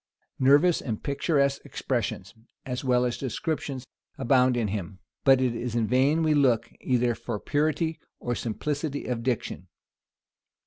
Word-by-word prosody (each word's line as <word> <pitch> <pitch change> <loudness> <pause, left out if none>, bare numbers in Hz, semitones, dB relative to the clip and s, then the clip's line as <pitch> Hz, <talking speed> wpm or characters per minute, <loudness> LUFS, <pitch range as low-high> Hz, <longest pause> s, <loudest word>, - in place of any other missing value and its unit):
Nervous 145 +6 +5
and 110 -4 -4
picturesque 140 -1 +1
expressions, 110 -6 -3 0.3
as 125 0 -4
well 125 -1 +3
as 120 - -2
descriptions, 135 0 -3 0.3
abound 130 -1 +3
in 110 -4 0
him; 95 -2 -4 0.3
but 135 -1 +6
it 130 -2 +1
is 120 0 -3
in 115 -2 +2
vain 135 +8 +3
we 155 -1 +3
look 120 -6 +2
either 125 -2 +2
for 115 -1 -5
purity 155 - 0 0.2
or 120 - -2
simplicity 145 +6 -3
of 120 -2 -2
diction. 120 -1 -2
130 Hz, 140 wpm, -27 LUFS, 120-145 Hz, 0.3 s, but